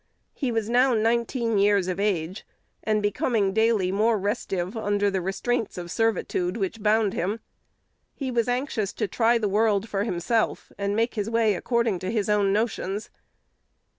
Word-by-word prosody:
He 265 -5 -2
was 225 -2 -1
now 250 +2 +3
nineteen 230 0 +1
years 200 -2 +3
of 185 0 -2
age, 190 -2 -1 0.4
and 215 -1 0
becoming 205 -1 +1
daily 220 -4 +2
more 215 +3 +2
restive 195 -2 -2
under 205 -2 0
the 190 -1 -1
restraints 205 +5 -2
of 175 -1 -6
servitude 215 -4 0
which 210 +1 -3
bound 215 -1 +2
him. 200 +6 -2 0.8
He 265 -3 -3
was 235 -1 +1
anxious 245 -5 -1
to - - -2
try 235 +2 +2
the 220 -2 0
world 210 +1 +2
for 200 -2 -1
himself, 215 +3 -1
and 200 0 -2
make 230 +2 +1
his 210 -1 -2
way 225 -2 +2
according 235 -1 0
to 185 - -4
his 210 -2 -1
own 205 -2 +3
notions. 205 -1 -2
210 Hz, 165 wpm, -25 LUFS, 195-230 Hz, 0.8 s, now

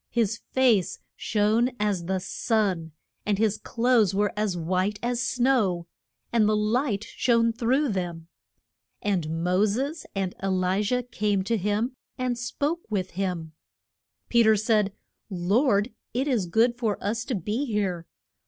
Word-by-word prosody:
His 230 -1 0
face 240 -8 +3 0.2
shone 215 +3 +2
as 205 -5 0
the 190 +2 0
sun, 190 -3 -1 0.3
and 205 -1 0
his 215 -1 +1
clothes 230 -5 +2
were 205 0 +1
as 210 -4 -1
white 185 +5 0
as 240 0 0
snow, 240 -10 +1 0.5
and 215 -3 +4
the 215 - +3
light 215 0 +1
shone 230 0 +2
through 255 +5 +1
them. 175 -5 -3 0.8
And 165 -5 -1
Mo 180 +3 +3
ses 275 +10 -2
and 190 -2 -1
E - - 0
li 185 +1 +1
jah 250 +4 0
came 210 -5 0
to 230 +4 0
him, 210 +5 0 0.2
and 255 -1 0
spoke 285 +7 -2
with 190 -4 -2
him. 175 -4 -3 0.7
Pe 235 - +4
ter 220 -1 +6
said, 210 -1 +2 0.4
Lord, 205 +5 +2 0.2
it 265 +4 +1
is 230 -10 +1
good 235 +7 +2
for 220 -4 0
us 220 +3 -2
to 255 - -2
be 210 - -2
here. 195 -8 -2
210 Hz, 150 wpm, -26 LUFS, 190-235 Hz, 0.8 s, ter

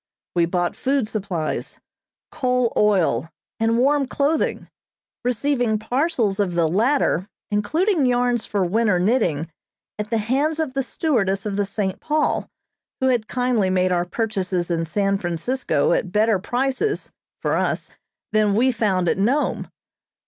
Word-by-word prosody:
We 170 -1 +2
bought 175 0 -1
food 265 -3 0
supplies, 190 -7 -3 0.5
coal 250 -3 0
oil, 175 - +2 0.3
and 225 +1 +2
warm 275 +2 +3
clothing, 290 +4 0 0.6
receiving 245 -2 +1
parcels 230 - 0
of 185 -4 0
the 170 -2 +3
latter, 210 - +1 0.2
including 310 - +1
yarns 245 -2 +1
for 200 -3 0
winter 210 +1 +2
knitting, 175 - +1 0.5
at 210 0 -3
the 225 - +1
hands 275 +9 0
of 310 -5 -1
the 270 - 0
stewardess 220 - 0
of 205 -2 -2
the 200 0 0
"St. 195 -1 -2
Paul," 305 0 0 0.5
who 260 - +2
had 235 -4 +1
kindly 245 -6 +1
made 185 0 +2
our 175 -1 +1
purchases 185 -4 -2
in 165 -1 0
San 195 +3 0
Francisco 175 +10 0
at 185 - -1
better 215 0 +3
prices 270 - -1 0.3
(for - - 0
us) - - -1 0.4
than 215 -2 +2
we 255 +4 +3
found 195 -6 0
at 175 - +1
Nome. 255 +9 0
215 Hz, 140 wpm, -22 LUFS, 190-255 Hz, 0.6 s, warm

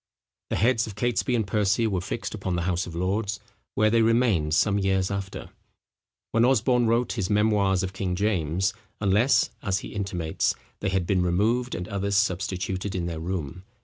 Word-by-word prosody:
The - - -1
heads 115 +1 +2
of 105 - -8
Catesby 120 +3 0
and 110 -3 +1
Percy 105 +2 +1
were 95 -5 0
fixed 115 +5 -4
upon 95 -4 -3
the 85 - -1
House 90 0 -1
of 85 - -8
Lords, 100 +4 -1 0.4
where 110 +1 +3
they 115 0 +4
remained 110 -10 +2
some 100 +2 +3
years 95 -1 +1
after, 100 -1 -5 0.8
when 115 - +3
Osborne 125 -1 +3
wrote 115 +1 +1
his 95 - -2
Memoirs 105 -3 +2
of 95 0 -4
King 95 -2 -2
James; 95 0 0 0.3
unless, 105 +6 +3
as 100 -3 -1
he - - -7
intimates, 90 -6 -1 0.2
they 100 - -1
had 95 -2 0
been 95 0 +1
removed, 110 +8 +1
and 90 +1 -5
others 100 -1 -1
substituted 95 0 -1
in 90 -2 -1
their 85 -2 -4
room. 90 0 -4
100 Hz, 180 wpm, -26 LUFS, 90-110 Hz, 0.8 s, they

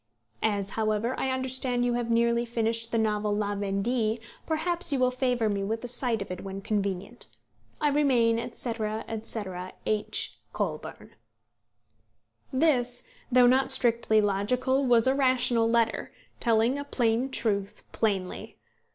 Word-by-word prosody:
As, 200 -2 0
however, 220 +2 0
I 265 - 0
understand 260 -1 0
you 245 - +1
have 240 -1 -2
nearly 235 0 +2
finished 230 0 -1
the 230 - +1
novel 210 -1 0
La 205 -1 -1
Vendée, 215 +3 -1 0.3
perhaps 335 +1 -1
you 280 - +1
will 255 -1 +2
favour 250 -3 0
me 200 -1 -1
with 225 +4 -3
a - - -4
sight 240 -3 +1
of 195 - -11
it 180 - -6
when 195 0 -6
convenient. 200 +2 -3 0.5
I 300 - +2
remain, 245 -6 +2
&c. 250 -4 -4 0.5
&c. 225 0 -3 0.4
H. 215 -1 -1
COLBURN. - - -4 1.4
This, 255 -4 +1 0.2
though 250 0 +6
not 260 +2 +4
strictly 235 -4 +3
logical, 245 +7 +1
was 235 -2 +4
a 260 - +4
rational 255 -4 +3
letter, 230 -1 +1 0.3
telling 235 +3 +2
a - - -3
plain 240 -2 0
truth 200 -6 -1
plainly. 195 -5 -2
235 Hz, 140 wpm, -27 LUFS, 215-255 Hz, 1.4 s, though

